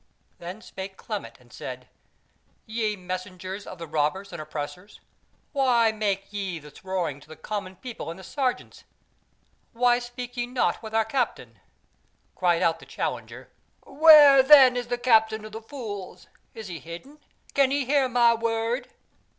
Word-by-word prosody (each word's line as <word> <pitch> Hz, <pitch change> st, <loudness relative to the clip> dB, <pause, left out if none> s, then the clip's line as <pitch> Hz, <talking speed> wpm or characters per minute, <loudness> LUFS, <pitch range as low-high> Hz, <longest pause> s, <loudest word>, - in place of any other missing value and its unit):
Then 180 Hz, +6 st, -8 dB
spake 190 Hz, 0 st, -8 dB
Clement -, -, -6 dB
and -, -, -21 dB
said: -, -, -8 dB, 0.8 s
"Ye 220 Hz, -1 st, -1 dB
messengers 185 Hz, +1 st, -6 dB
of 185 Hz, -, -8 dB
the 165 Hz, -, -7 dB
robbers 160 Hz, +6 st, -1 dB
and 170 Hz, -, -5 dB
oppressors, 155 Hz, +6 st, -7 dB, 0.5 s
why 245 Hz, -6 st, +3 dB
make 205 Hz, -2 st, -2 dB
ye 195 Hz, -4 st, -3 dB
this 150 Hz, +6 st, -14 dB
roaring 180 Hz, -7 st, -2 dB
to -, -, -18 dB
the 160 Hz, -, -11 dB
common 190 Hz, +3 st, -5 dB
people 240 Hz, -2 st, -7 dB
and 165 Hz, -, -7 dB
the 190 Hz, -, -12 dB
sergeants? 255 Hz, +6 st, -3 dB, 0.9 s
Why 240 Hz, +1 st, +3 dB
speak 245 Hz, 0 st, -8 dB
ye 240 Hz, -1 st, -2 dB
not 250 Hz, +1 st, 0 dB
with 220 Hz, -1 st, -7 dB
our 225 Hz, 0 st, +3 dB
Captain?" 220 Hz, -, -3 dB, 0.8 s
Cried 175 Hz, -2 st, +2 dB
out 165 Hz, -1 st, +2 dB
the -, -, -13 dB
challenger, -, -, -5 dB, 0.4 s
"Where 290 Hz, -2 st, +8 dB
then 265 Hz, -2 st, +8 dB
is 245 Hz, -1 st, -3 dB
the 245 Hz, 0 st, -1 dB
Captain 220 Hz, -3 st, +3 dB
of 215 Hz, -, -9 dB
the 220 Hz, +1 st, -7 dB
Fools? 205 Hz, -8 st, -8 dB, 0.3 s
is 220 Hz, -2 st, -8 dB
he 170 Hz, -3 st, -6 dB
hidden? 215 Hz, -, -10 dB, 0.3 s
can 275 Hz, -2 st, +4 dB
he 280 Hz, 0 st, 0 dB
hear 275 Hz, 0 st, +2 dB
my 240 Hz, -1 st, +5 dB
word?" 230 Hz, +2 st, -1 dB
220 Hz, 160 wpm, -26 LUFS, 185-245 Hz, 0.9 s, Where